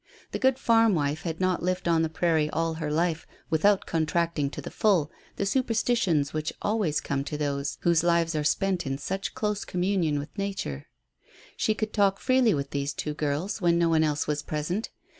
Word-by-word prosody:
The - - -3
good 260 -1 +3
farm 225 -4 +4
wife 150 0 -1
had 165 -2 -4
not 185 -1 +1
lived 180 0 -1
on 165 -1 +3
the 160 - 0
prairie 160 -2 +1
all 165 +1 -1
her 160 -1 -4
life 165 +1 0 0.2
without 195 +5 +3
contracting 160 -2 0
to - - -8
the - - -7
full 180 -9 +2 0.2
the 200 - -1
superstitions 225 - +1
which 155 0 -2
always 205 -8 0
come 140 -1 -2
to 150 +1 -4
those 145 -1 -2
whose 170 -1 +3
lives 170 -1 +2
are 155 -1 -1
spent 185 +2 0
in 135 0 -2
such 190 +7 -4
close 210 -1 -1
communion 180 -4 0
with 145 +1 -6
Nature. 195 - -4 0.7
She 215 - +1
could 215 0 -3
talk 195 -2 +2
freely 255 - +3
with 140 -1 -4
these 140 0 -2
two 150 - -3
girls 150 +8 -2
when 170 -1 +3
no 170 -1 +3
one 160 -1 +3
else 150 -1 0
was 150 0 -1
present. 155 +8 -3
165 Hz, 195 wpm, -27 LUFS, 150-195 Hz, 0.7 s, farm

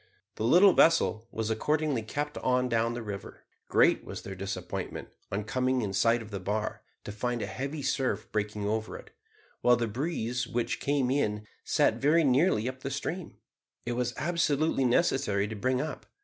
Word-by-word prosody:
The - - -5
little 180 - +7
vessel 120 -9 +3
was 110 0 -2
accordingly 150 +2 0
kept 145 +7 -4
on 125 0 +1
down 115 0 +1
the 120 - -5
river. 100 -2 -7 0.3
Great - - +4
was - - -7
their 95 - -6
disappointment, 95 +1 -5 0.2
on 100 +1 -1
coming 130 +3 0
in 100 -2 -3
sight 115 +3 +3
of 110 - -13
the 100 - -4
bar, 105 +3 -2 0.2
to - - -6
find 120 +3 -2
a - - -2
heavy 140 +3 -5
surf 135 -1 -1
breaking 105 -1 -2
over 110 +1 -2
it, - - -14 0.5
while 125 0 +5
the 120 0 0
breeze 125 -1 -2
which 120 0 -2
came 140 -3 +1
in 105 -6 0 0.2
set - - +2
very 155 +4 +4
nearly 130 - +3
up 130 0 -5
the 135 - -4
stream. 160 +6 -4 0.5
It 120 - -2
was 125 0 -1
absolutely 155 -4 +1
necessary 120 -6 +2
to 110 - -6
bring 130 +4 0
up. 150 +2 -5
125 Hz, 175 wpm, -29 LUFS, 110-140 Hz, 0.5 s, little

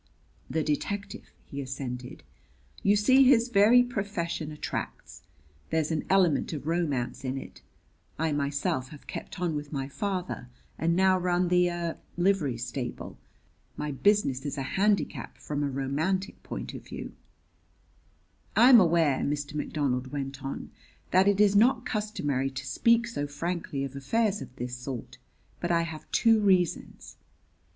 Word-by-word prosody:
"The 160 0 0
detective," 200 +7 -3 0.2
he 140 - -6
assented. 130 -2 -6 0.6
"You 200 +1 +4
see 260 +6 +5
his 250 -2 +5
very 230 +3 +6
profession 195 - -3
attracts. 150 - -6 0.5
There's 160 0 0
an 160 - -1
element 185 -5 +3
of 145 -2 -5
romance 155 -7 -1
in 130 0 -2
it. 135 - -9 0.6
I 160 +1 0
myself 140 -3 -1
have 150 - -13
kept - - -7
on 175 -3 0
with 145 -1 -5
my 135 -3 -3
father 185 - -4 0.3
and 170 +1 +2
now 190 0 +4
run 180 0 +1
the 180 0 +4
er 170 -1 -3 0.2
livery 175 -9 +2
stable. 120 +1 -5 0.6
My 150 - -3
business 140 -4 +2
is 145 0 -4
a 135 - -2
handicap 200 +1 0
from 145 -1 -4
a 145 - 0
romantic 150 +9 -2
point - - -6
of - - -7
view. - - -7 1.4
"I 245 - +7
am 240 - +10
aware," 165 -6 +3
Mr. 145 0 -2
McDonald 140 -4 -1
went 135 -1 -5
on, 135 - -5 0.4
"that 185 +2 +5
it 200 -1 +3
is 205 -1 +5
not 240 +3 +4
customary 145 - -1
to 135 0 -6
speak 230 - +3
so 185 -12 -3
frankly 150 -1 -3
of 135 0 -5
affairs 210 - 0
of 125 - -9
this 125 0 -4
sort; 125 -1 -7 0.4
but 175 - -2
I 170 -1 +3
have 160 -2 -7
two 225 -2 +4
reasons. 185 -5 0
160 Hz, 150 wpm, -28 LUFS, 140-195 Hz, 1.4 s, am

